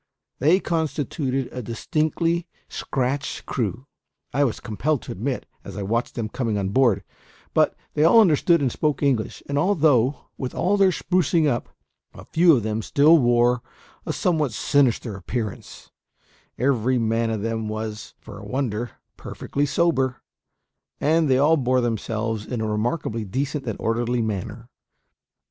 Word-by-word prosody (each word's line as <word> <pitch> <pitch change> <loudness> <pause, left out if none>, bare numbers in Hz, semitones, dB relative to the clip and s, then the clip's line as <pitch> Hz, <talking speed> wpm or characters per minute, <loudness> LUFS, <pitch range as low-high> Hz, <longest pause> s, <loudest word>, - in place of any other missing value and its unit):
They 160 +7 +4
constituted 145 -5 -2
a 125 - -5
distinctly 160 +8 -1 0.2
scratch 135 +1 -3
crew, 115 +1 -3 0.5
I 145 +3 +3
was 125 -6 -1
compelled 135 +6 -1
to - - -7
admit, 125 +7 -3 0.2
as 100 -1 -9
I 100 - -3
watched 115 +5 -1
them 115 -3 -2
coming 110 -1 -2
on 95 -1 -1
board; 110 -3 +3 0.5
but - - +3 0.2
they 150 - +2
all 170 +8 +7
understood 170 -4 +4
and 130 - +1
spoke 150 0 -1
English; 130 -6 0
and 140 0 0
although, 150 - +2
with 130 -2 -4
all 200 +3 +2
their 195 -1 +5
sprucing 175 -3 +1
up, 120 -5 -1 0.5
a - - -11
few 165 -1 +5
of 120 - -1
them 110 +1 -2
still 150 +8 +5
wore 120 -1 +3 0.4
a - - -3
somewhat 155 -8 0
sinister 125 -4 +1
appearance, 105 +3 -6 0.7
every 130 -1 +1
man 115 0 +1
of 110 -2 -2
them 115 -1 -2
was, 110 0 -5
for - - -11
a - - -11
wonder, 120 -3 -2 0.2
perfectly 145 +1 -3
sober, 135 -5 +1 0.8
and 160 0 +2
they 130 - +4
all 150 +4 +4
bore 130 -2 +2
themselves 115 -1 -2
in 125 - -3
a 110 - -1
remarkably 115 +2 -1
decent 135 +7 -3
and 110 - -3
orderly 120 +1 0
manner. 110 +2 -4
125 Hz, 150 wpm, -23 LUFS, 115-150 Hz, 0.8 s, all